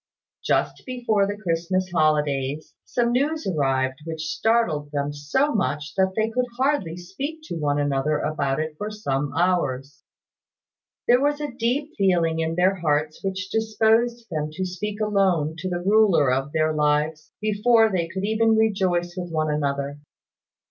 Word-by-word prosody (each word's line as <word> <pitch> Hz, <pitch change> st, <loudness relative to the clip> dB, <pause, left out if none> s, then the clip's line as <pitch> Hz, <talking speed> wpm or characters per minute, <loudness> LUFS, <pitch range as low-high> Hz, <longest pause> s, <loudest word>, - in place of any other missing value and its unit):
Just -, -, 0 dB
before 235 Hz, -6 st, +1 dB
the 205 Hz, 0 st, -4 dB
Christmas 185 Hz, 0 st, -1 dB
holidays, 150 Hz, -3 st, 0 dB
some 240 Hz, -1 st, 0 dB
news 295 Hz, +6 st, 0 dB
arrived 135 Hz, -5 st, 0 dB
which 160 Hz, -1 st, -4 dB
startled 215 Hz, -11 st, +1 dB
them 145 Hz, 0 st, -2 dB
so 205 Hz, -, 0 dB
much 150 Hz, -6 st, -1 dB
that 190 Hz, -1 st, +1 dB
they 220 Hz, +1 st, 0 dB
could 250 Hz, +2 st, 0 dB
hardly 260 Hz, -, 0 dB
speak 270 Hz, -, -6 dB
to 310 Hz, -, -6 dB
one 145 Hz, -1 st, 0 dB
another 145 Hz, +1 st, +1 dB
about 140 Hz, -2 st, -1 dB
it 155 Hz, 0 st, -2 dB
for 210 Hz, -, -3 dB
some 145 Hz, -10 st, -2 dB
hours. 145 Hz, -7 st, 0 dB, 1.1 s
There 245 Hz, +2 st, +5 dB
was 290 Hz, +1 st, +1 dB
a 295 Hz, -2 st, -3 dB
deep 260 Hz, +6 st, -1 dB
feeling 170 Hz, -4 st, +2 dB
in 160 Hz, 0 st, -1 dB
their 185 Hz, +2 st, +2 dB
hearts 155 Hz, -2 st, -1 dB
which 190 Hz, -1 st, -3 dB
disposed 225 Hz, +2 st, +1 dB
them 155 Hz, -2 st, -2 dB
to 185 Hz, +4 st, -3 dB
speak 200 Hz, +4 st, -4 dB
alone 190 Hz, -7 st, +1 dB
to 185 Hz, +3 st, -3 dB
the 175 Hz, -1 st, -3 dB
Ruler 195 Hz, -9 st, +4 dB
of 135 Hz, +2 st, -1 dB
their 155 Hz, 0 st, +1 dB
lives, 150 Hz, +1 st, 0 dB
before 220 Hz, +1 st, +3 dB
they 175 Hz, -3 st, 0 dB
could 190 Hz, +3 st, -4 dB
even 220 Hz, +1 st, +3 dB
rejoice 185 Hz, -5 st, +1 dB
with 180 Hz, -1 st, -5 dB
one 155 Hz, -1 st, 0 dB
another. 140 Hz, -1 st, -2 dB
180 Hz, 155 wpm, -24 LUFS, 150-220 Hz, 1.1 s, There